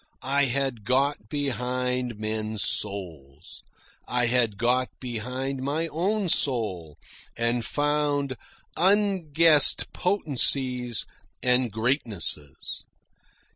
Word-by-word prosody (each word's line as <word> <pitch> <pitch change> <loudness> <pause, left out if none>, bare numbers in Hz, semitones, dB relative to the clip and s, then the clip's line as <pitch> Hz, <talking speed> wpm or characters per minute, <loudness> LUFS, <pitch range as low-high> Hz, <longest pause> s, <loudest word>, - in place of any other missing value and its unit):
I 140 +2 +2
had 130 -3 -1
got 130 -1 0
behind 125 -3 -2
men's 110 -1 -3
souls. 80 -7 -2 0.5
I 125 0 0
had 120 -4 +1
got 125 +3 +1
behind 130 +3 -4
my 155 +5 -1
own 195 +6 -1
soul 105 - 0 0.4
and 115 +1 0
found 145 -1 0 0.4
unguessed 170 -6 +4
potencies 130 - +1 0.4
and 125 -1 +2
greatnesses. 110 - -2
125 Hz, 85 wpm, -26 LUFS, 110-145 Hz, 0.5 s, unguessed